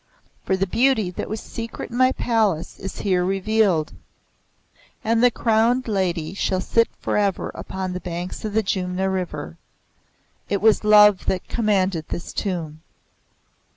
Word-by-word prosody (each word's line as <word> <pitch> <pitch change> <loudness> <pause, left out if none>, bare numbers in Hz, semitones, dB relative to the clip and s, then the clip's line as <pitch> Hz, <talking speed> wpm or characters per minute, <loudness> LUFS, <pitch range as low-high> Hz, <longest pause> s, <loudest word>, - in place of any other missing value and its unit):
For 190 - +1
the 195 - +1
beauty 225 -2 +2
that - - -5
was 215 +1 -3
secret 230 0 -7
in - - -6
my 255 +1 +4
Palace 215 -11 0
is 195 - -6
here 185 -3 +1
revealed; 195 -3 +1 1.1
and 230 +2 +2
the 245 - +7
Crowned 235 +2 +1
Lady 180 -6 -1
shall 190 -1 -1
sit 230 +5 +2
forever 200 -3 0
upon 190 -1 -5
the 180 - -4
banks 175 0 -6
of 215 -2 -4
the 220 +1 +2
Jumna 190 0 -1
River. 185 -2 -4 0.9
It 200 - 0
was 220 +1 +4
love 210 -2 +6
that 185 - -1
commanded 195 -7 0
this 175 - -5
Tomb." 165 -6 -4
195 Hz, 145 wpm, -22 LUFS, 180-220 Hz, 1.1 s, the